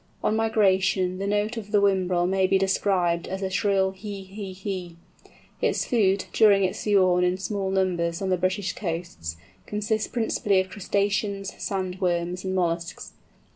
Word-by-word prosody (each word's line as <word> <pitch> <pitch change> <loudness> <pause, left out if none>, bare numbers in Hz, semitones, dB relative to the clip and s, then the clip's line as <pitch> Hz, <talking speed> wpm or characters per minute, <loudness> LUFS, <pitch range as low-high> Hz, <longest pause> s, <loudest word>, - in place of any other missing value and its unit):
On 215 - +2
migration 190 -4 +2
the 195 - -2
note 210 +3 0
of 205 -2 -7
the 210 - +4
Whimbrel 185 -3 +2
may 190 0 +2
be 195 - +3
described 190 -3 +1
as 190 +1 -4
a 190 - -2
shrill 195 -1 +2
hee 200 0 -7
hee 195 0 -7
hee. 185 -2 -5 0.7
Its - - +1
food, 200 -5 +2
during 205 -3 +5
its 185 - -1
sojourn 185 -4 +3
in 180 +1 +1
small 195 0 -2
numbers 175 -3 0
on 195 - -2
the 185 - +3
British 185 0 -1
coasts, 165 - -5 0.3
consists 210 +1 -1
principally 215 -4 +1
of 190 0 -1
crustaceans, 200 0 -1
sand 190 -1 -3
worms, 175 0 -1
and 190 0 -2
molluscs. 170 -1 -2
190 Hz, 160 wpm, -25 LUFS, 180-200 Hz, 0.7 s, during